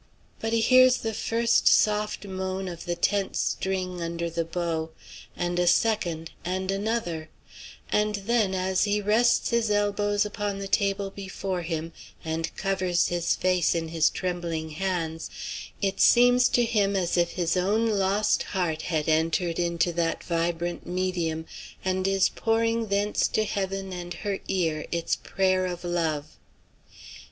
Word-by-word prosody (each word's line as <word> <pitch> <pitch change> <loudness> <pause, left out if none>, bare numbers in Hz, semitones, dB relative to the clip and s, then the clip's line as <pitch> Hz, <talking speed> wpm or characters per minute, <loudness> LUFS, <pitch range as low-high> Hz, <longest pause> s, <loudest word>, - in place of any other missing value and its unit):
But 225 - -2
he 230 0 +2
hears 255 +2 +6
the 225 -2 -3
first 230 +2 +1
soft 210 -1 +3
moan 190 0 -3
of 170 -1 -7
the 175 -1 -1
tense 200 +2 0
string 185 -2 -2
under 170 0 -3
the 165 0 -1
bow, 165 -1 -2 0.5
and 175 0 -1
a 175 - +2
second, 175 -5 +1
and 185 +1 -2
another; 195 -6 -2 0.6
and 210 0 +2
then, 205 -1 +1
as 185 +1 +1
he 205 0 +1
rests 220 +5 +2
his 235 -2 +1
elbows 205 0 +1
upon 205 -1 -3
the 195 0 -5
table 200 0 0
before 190 -2 -4
him, 165 -1 -4 0.3
and 160 0 -2
covers 185 -3 +1
his 175 -1 0
face 180 -2 +2
in 165 -1 -2
his 160 -1 +3
trembling 170 -3 -3
hands, 165 -1 -3 0.5
it 195 -1 0
seems 245 +1 +6
to 240 - +3
him 205 -3 +1
as 180 -3 0
if 175 -1 +1
his 170 -2 0
own 205 +5 +2
lost 205 -1 +2
heart 170 -5 -2
had 155 -2 -2
entered 165 +2 +1
into 170 0 +1
that 165 0 -1
vibrant 170 0 -2
medium, 175 -3 -2 0.4
and 185 0 0
is 195 -1 +3
pouring 225 0 0
thence 205 +1 +1
to 215 - 0
heaven 195 -2 -3
and 175 -1 -6
her 200 -2 -3
ear 160 -5 -1
its 170 -1 0
prayer 185 -1 0
of 175 -1 -5
love. 160 -4 -2
185 Hz, 150 wpm, -26 LUFS, 170-205 Hz, 0.6 s, hears